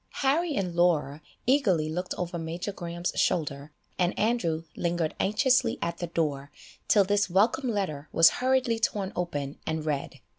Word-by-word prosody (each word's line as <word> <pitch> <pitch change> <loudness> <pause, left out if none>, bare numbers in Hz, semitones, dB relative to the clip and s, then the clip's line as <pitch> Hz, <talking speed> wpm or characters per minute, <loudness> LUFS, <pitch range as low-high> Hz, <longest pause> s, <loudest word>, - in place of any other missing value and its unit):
Harry 310 +3 +2
and 180 -3 -2
Laura 160 -4 +2 0.2
eagerly 220 - +3
looked 180 +4 -3
over 175 -1 -3
Major 165 +5 -4
Graham's 175 -2 -4
shoulder, 150 -4 0 0.3
and 180 0 +1
Andrew 185 -8 0
lingered 170 -2 -1
anxiously 245 +4 +2
at 170 0 -3
the 175 - -3
door, 145 -4 -2 0.4
till 205 - +5
this 205 +1 +1
welcome 225 +8 +2
letter 180 -9 -3
was 165 0 +7
hurriedly 255 -3 +2
torn 200 -3 -1
open 145 -5 -3
and 160 -1 -2
read. 145 -3 -3
175 Hz, 150 wpm, -27 LUFS, 160-210 Hz, 0.4 s, was